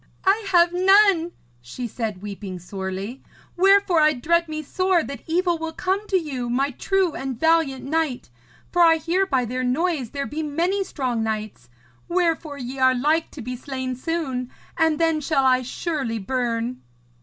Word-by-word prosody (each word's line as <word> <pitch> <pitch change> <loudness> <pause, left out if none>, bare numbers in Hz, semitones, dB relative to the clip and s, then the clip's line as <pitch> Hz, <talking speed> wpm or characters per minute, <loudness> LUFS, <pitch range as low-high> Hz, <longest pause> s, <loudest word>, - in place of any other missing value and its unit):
'I 405 +3 +3
have 345 -1 +5
none,' 375 -2 +4 0.3
she 235 - -6
said, 215 -4 -5
weeping 200 -2 -6
sorely, 190 +6 -6 0.3
'wherefore 390 -1 +4
I 305 0 +5
dread 335 +6 +1
me 310 0 -4
sore 370 +2 +1
that 275 - -7
evil 345 0 +1
will 325 0 -4
come 385 +5 -1
to 385 - +2
you, 265 -8 -3
my 270 +4 +1
true 380 +4 0
and 265 -3 -5
valiant 320 -5 +2
knight, 295 - -2 0.4
for 350 - +2
I 330 -1 +7
hear 340 +5 0
by 260 -7 +1
their 255 +2 -3
noise 275 0 0
there 280 +2 -4
be 300 +8 -4
many 340 +7 0
strong 255 -9 -2
knights, 215 - -4 0.4
wherefore 335 -4 0
ye 260 0 -6
are 260 0 +4
like 305 +6 +1
to 275 - -9
be 250 +2 -4
slain 260 0 -4
soon, 265 -3 -3 0.3
and 320 -2 +2
then 325 -1 +1
shall 275 -2 +1
I 255 -1 +4
surely 260 -2 -3
burn.' 235 +2 -2
290 Hz, 165 wpm, -23 LUFS, 250-340 Hz, 0.4 s, I